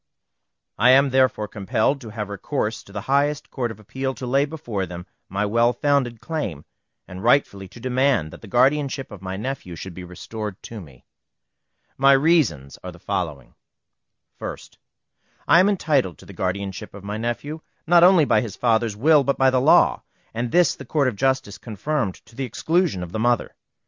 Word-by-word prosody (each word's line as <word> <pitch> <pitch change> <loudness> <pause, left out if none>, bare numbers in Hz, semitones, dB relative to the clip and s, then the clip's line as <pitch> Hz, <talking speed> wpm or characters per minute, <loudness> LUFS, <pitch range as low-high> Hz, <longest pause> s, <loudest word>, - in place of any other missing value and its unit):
I 120 +4 +5
am 135 +1 +5
therefore 130 -5 +2
compelled 110 +7 -1
to 115 - -9
have 105 -1 -5
recourse 110 +2 -3
to - - -15
the 105 0 -5
highest 145 +4 0
Court 125 -3 -2
of 110 -2 -9
Appeal 130 +5 -4
to 130 - -7
lay 135 +3 +2
before 120 - -4
them 90 +1 -8 0.2
my 100 +2 -1
well 115 +3 +2
founded 135 -6 0
claim, 115 - -4 0.4
and 90 +1 -9
rightfully 115 -6 +2
to 120 - -14
demand 125 - +1
that - - -12
the 110 - -11
guardianship 135 +3 +1
of 105 -3 -10
my 95 0 -5
nephew 110 -6 -5
should 90 +3 -8
be 90 - -9
restored 95 +3 -7
to 115 -3 -8
me. 70 -7 -16 0.9
My 135 +1 +6
reasons 135 - +2
are 90 - -6
the 90 - -14
following: 80 -10 -4 0.9
1st. - - -8 0.7
I 170 - +7
am 190 +3 +5
entitled 145 - +1
to - - -16
the - - -12
guardianship 95 +1 -4
of 100 - -11
my 105 +1 -4
nephew, 120 +7 -4 0.2
not 175 +1 +5
only 180 -4 +6
by - - +3
his 110 -5 -6
father's 115 -2 +1
will, 150 +4 +5
but 140 +1 0
by 135 0 +4
law, 130 0 +4 0.3
and 120 +1 -2
this 175 -1 +4
the - - -10
Court 140 +1 +1
of 120 - -7
Justice 130 -3 -1
confirmed 120 -1 -2
to 115 +2 -19
the 135 - -3
exclusion 155 - 0
of 85 - -8
the 110 - -3
mother. 120 +1 +1
120 Hz, 185 wpm, -23 LUFS, 100-140 Hz, 0.9 s, I